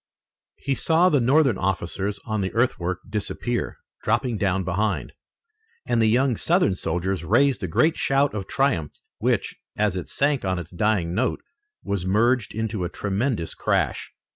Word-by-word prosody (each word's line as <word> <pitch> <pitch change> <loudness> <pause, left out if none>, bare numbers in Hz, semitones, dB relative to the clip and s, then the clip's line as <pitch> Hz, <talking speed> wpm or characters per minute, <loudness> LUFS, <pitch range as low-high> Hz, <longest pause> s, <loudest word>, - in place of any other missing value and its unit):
He 140 - -1
saw 165 +8 +3
the 145 - +3
Northern 135 -2 +3
officers 95 +2 -1
on 110 -2 -1
the 95 - -2
earthwork 95 -7 0
disappear, 115 +3 -3 0.2
dropping 115 0 0
down 95 -1 +1
behind, 100 +4 -1 0.7
and 115 - +1
the 110 - +4
young 125 +1 +2
Southern 175 - +2
soldiers 90 +1 -2
raised 125 - +3
a 95 - -2
great 155 - +2
shout 140 +1 +2
of 100 -3 -4
triumph 130 - 0 0.3
which, - - 0 0.2
as 105 -3 +1
it 90 - -5
sank 140 -1 +1
on 95 -1 0
its 85 -1 -7
dying 90 -2 0
note, 120 +7 -1 0.4
was 100 -3 -2
merged 110 +5 +1
into 110 -3 -2
a 85 - -2
tremendous 100 -1 -2
crash. - - -1
105 Hz, 155 wpm, -24 LUFS, 95-130 Hz, 0.7 s, the